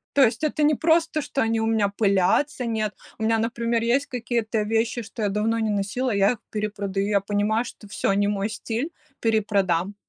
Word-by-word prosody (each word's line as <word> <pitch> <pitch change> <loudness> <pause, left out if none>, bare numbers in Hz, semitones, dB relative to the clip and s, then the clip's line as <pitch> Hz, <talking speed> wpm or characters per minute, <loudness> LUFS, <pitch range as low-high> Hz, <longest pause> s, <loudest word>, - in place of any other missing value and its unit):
То 280 - +6
есть 250 +6 +1
это 305 0 +1
не 300 0 +4
просто, 320 0 +2
что 275 - -2
они 225 0 +1
у - - +1
меня 220 -2 +2
пылятся, 200 +7 +1
нет. 215 -2 -1 0.2
У 220 - -4
меня, 225 0 +3
например, 230 0 0
есть 250 +5 +1
какие-то 230 -3 -1
вещи, 225 +2 0
что 220 +1 -8
я 205 - +2
давно 215 +3 0
не 220 - 0
носила, 210 +4 -1
и - - 0
я 200 +3 +4
их 230 - -11
перепродаю. 205 -2 -2
Я 200 -2 +2
понимаю, 210 +3 0
что 210 - -11
всё, 200 -1 0
не 205 0 +2
мой 205 +1 -1
стиль, 235 +7 -3 0.3
перепродам. 200 -4 +1
220 Hz, 200 wpm, -24 LUFS, 205-235 Hz, 0.3 s, То